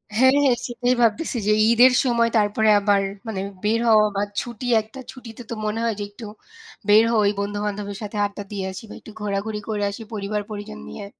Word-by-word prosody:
হ্যাঁ, 260 +3 +5
হ্যাঁ, 250 -3 +3
সেটাই 245 +1 0
ভাবতেছি 240 +4 +1
যে, 215 - +4 0.2
ঈদের 245 +3 +6
সময়, 235 -2 +2
তারপরে 215 +1 +2
আবার 200 -1 +2 0.3
মানে 205 -4 -3 0.2
বের 220 +2 +2
হওয়া 215 -1 +6
বা 200 - 0 0.2
ছুটি 240 0 -8 0.2
একটা 220 +5 -13
ছুটিতে 245 -3 -11
তো - - -3
মনে 215 +2 -2
হয় 230 -1 +1
যে - - -2
একটু 210 +3 -11 0.6
বের 215 +2 +7
হই, 225 - +3
ওই 200 - +3
বন্ধু-বান্ধবের 205 0 -3
সাথে 210 0 -6
আড্ডা 205 0 -6
দিয়ে 195 -2 -3
আসি 190 - -9
বা - - -9
একটু - - -13
ঘোরাঘুরি 210 +1 -2
করে 210 -1 -1
আসি, 200 +3 -8
পরিবার 210 0 -2
পরিজন 215 +1 -7
নিয়ে। 205 - -8
215 Hz, 200 wpm, -22 LUFS, 205-230 Hz, 0.6 s, বের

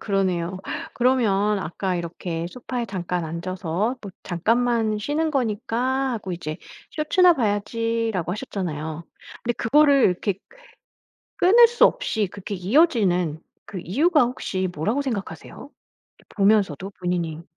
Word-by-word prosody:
그러네요. 185 -3 -1 0.4
그러면 210 -5 +2
아까 185 +1 -3
이렇게 170 0 -4
소파에 245 +1 -4
잠깐 180 -3 -3
앉아서 180 +6 -2
또 200 -3 -8
"잠깐만 225 +4 +1
쉬는 305 +7 -1
거니까 255 +1 -1
하고 200 -5 -4
이제 155 -2 -5 0.3
쇼츠나 345 +3 +4
봐야지."라고 225 - -1
하셨잖아요. 170 - -4 0.4
근데 240 - 0
그거를 280 +2 +4
이렇게 185 +1 0
그 - - -21 0.8
끊을 460 +6 +7
수 475 - +4
없이 220 - +1
그렇게 200 +1 -6
이어지는 185 - +2 0.2
그 195 - -7
이유가 300 - +3
혹시 190 -6 -2
뭐라고 215 - 0
생각하세요? 225 - -6 0.5
이 - - -23
보면서도 195 -4 +2
본인이 170 -3 -2
205 Hz, 305 characters per minute, -23 LUFS, 180-250 Hz, 0.8 s, 끊을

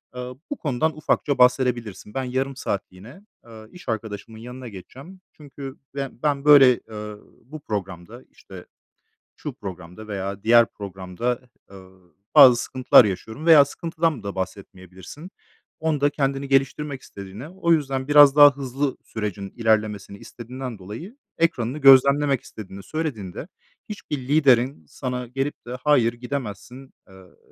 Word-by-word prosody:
ııı, 125 0 -7 0.2
bu 290 - -3
konudan 155 +2 -1
ufakça 145 -2 0
bahsedebilirsin. 125 -5 +1
"Ben 135 - -2
yarım 130 +2 -2
saatliğine, 100 - -6 0.2
aaa, 110 -2 -13
iş 180 -7 -11
arkadaşımın 110 0 -5
yanına 125 +2 -9
geçeceğim. 135 - -13
Çünkü 140 -2 -10 0.2
be 135 -1 -3
ben, 145 -1 0
böyle, 135 -4 +7
ııı, 105 -1 -8 0.2
bu 155 +4 -10
programda", 100 +1 -6
işte, 95 -2 -13 0.7
şu - - -6
programda 95 +2 -10
veya 100 0 -5
diğer 115 +1 +6
programda, 100 +5 -4 0.3
ııı, 95 -3 -17 0.2
"bazı 130 -5 +9
sıkıntılar 130 0 +4
yaşıyorum." 110 - -5
veya 155 -4 +8
sıkıntıdan 160 - -2
da 100 -1 -6
bahsetmeyebilirsin. 95 - -8 0.5
Onda 150 -3 +1
kendini 135 -1 -2
geliştirmek 135 +1 0
istediğine, 100 +8 -10
o 170 -2 0
yüzden 135 -3 -1
biraz 145 -1 +7
daha 145 -1 +8
hızlı 135 0 -3
sürecin 100 -3 -5
ilerlemesini 105 -3 0
istediğinden 125 0 -8
dolayı 110 - -9 0.2
ekranını 135 -5 0
gözlemlemek 140 0 +5
istediğini 100 -2 -11
söylediğinde, 145 - -5 0.4
hiçbir 200 -9 -5
liderin 130 - +2
sana 125 - -5
gelip 135 +3 -4
de 125 +1 -5
"Hayır, 125 -6 +3
gidemezsin." 125 +1 -7
ııı, 95 -1 -18
125 Hz, 130 wpm, -23 LUFS, 105-140 Hz, 0.7 s, bazı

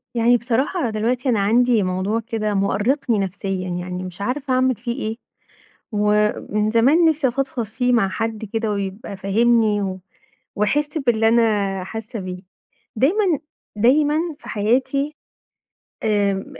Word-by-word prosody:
يعني 235 +1 +4
بصراحة 250 +5 -1
دلوقتي 240 +4 -1
أنا 225 -4 +2
عندي 230 +2 +3
موضوع 185 +4 -1
كده 220 -2 -2
مؤرقني 210 +5 +1
نفسيًا، 190 -1 -3
يعني 180 +1 -4
مش 185 +1 -8
عارفة 260 +5 -2
أعمل 255 0 +2
فيه 235 +2 -5
إيه، 220 +1 -3 0.8
ومن 210 0 +1
زمان 265 +10 +4
نفسي 305 -4 +2
افضفض 265 0 -2
فيه 245 +3 -1
مع 230 -5 +3
حد 225 +2 -3
كده، 225 -1 -1
ويبقى 200 0 -4
فاهمني 215 +1 +2
و 190 -1 -4 0.6
ويحس 295 +9 0
باللي 230 -5 +2
أنا 205 -5 +2
حاسة 220 +3 -6
بيه. 185 -1 -5 0.6
دايمًا 345 - +2 0.4
دايمًا 290 +7 +3 0.2
في - - -13
حياتي 265 +7 0 0.9
آآ 205 -2 +2
ب 195 - -4
225 Hz, 135 wpm, -21 LUFS, 200-250 Hz, 0.9 s, يعني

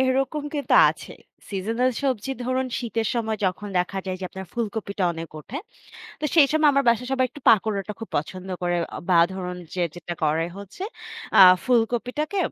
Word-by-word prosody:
এরকম 270 +3 +1
কিন্তু 290 -1 +1 0.2
আছে। - - -10 0.4
সিজনাল 225 +6 0
সবজি 265 -2 -1
ধরুন 255 +1 0
শীতের 230 -3 -2
সময় 220 -2 -1
যখন 190 +3 -3
দেখা 180 +2 -1
যায় 185 - -2
যে, 185 - -4
আপনার 190 0 -8
ফুলকপিটা 210 -4 -2
অনেক 165 0 -7
উঠে। 230 - -8 0.6
তো - - -4
সেই 310 -4 +7
সময় 310 -1 +4
আমার 275 0 +2
বাসায় 235 +2 +2
সবাই 260 -1 +2
একটু 290 - -12
পাকোড়াটা 210 -1 +3
খুব 225 - -6
পছন্দ 185 +5 -4
করে। 175 0 +1 0.3
বা 175 -2 +5
ধরুন 180 -1 -5 0.2
যে 180 - 0
যেটা 175 0 -6
করে 160 +2 +1
হচ্ছে 200 - -9 0.6
আ - - +10 0.2
ফুলকপিটাকে 250 - 0
220 Hz, 170 wpm, -24 LUFS, 185-255 Hz, 0.6 s, আ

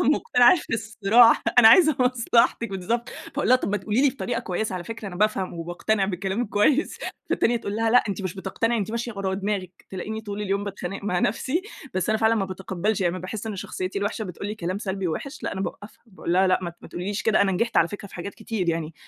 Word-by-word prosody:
مقتنعة 245 - +5
في 295 - -4
الصراحة، 225 +1 +4 0.2
أنا 220 - +10
عايزة 310 +3 +6
مصلحتك 235 -2 +2
بالضبط 230 +6 -2
فاقول - - -4
لها 255 - +7
طب - - -3
ما 205 - +1
تقولي 215 +5 0
لي 285 - +6
بطريقة 245 -3 -3
كويّسة 190 +2 -3
على 175 - -5
فكرة 225 0 -6
أنا 180 - -8
بافهم، 195 -2 0
وباقتنع 180 +5 -1
بكلامِك 195 +4 -2
كويّس، 255 - +2 0.3
فالتانية 240 +1 +2
تقول 205 -2 -4
لها 225 0 +1
لأ 250 - +5
أنتِ 200 0 -3
مش 185 -2 -3
بتقتنعي 220 +4 -1
أنتِ 205 +1 -2
ماشية 235 +1 -3
ورا 190 -1 -1
دماغِك، 190 -2 -4
تلاقيني 215 +4 -5
طول 210 -1 -6
اليوم 200 0 -1
باتخانق 195 -1 -6
مع 180 -3 0
نفسي، 260 - 0 0.3
بس 185 - -1
أنا 220 0 +2
فعلًا 225 +1 +3
ما 205 - 0
باتقبلش، 190 +2 -2
يعني 175 -2 +2
ما 185 - -4
باحس 195 +4 -6
إن 215 -3 -4
شخصيتي 185 +1 -4
الوحشة 205 +2 -2
بتقول 180 +2 -6
لي 210 - -3
كلام 185 -2 -3
سلبي 195 -3 -3
ووحش 275 - -5
لأ - - -2
أنا 190 - -4
باوقفها، 205 +2 -7
باقول 185 -4 -5
لها 190 +2 +4
لأ 185 - +3
ما 175 - -3
ت - - -19
ما - - -11
تقوليش 195 +4 -4
كده 220 -1 +3
أنا 195 -1 +1
نجحت 230 +5 -1
على 170 - +5
فكرة 205 0 -8
في - - -15
حاجات 190 +3 -6
كتير 220 -5 -3
يعني، 165 -1 -2
205 Hz, 235 wpm, -24 LUFS, 185-230 Hz, 0.3 s, أنا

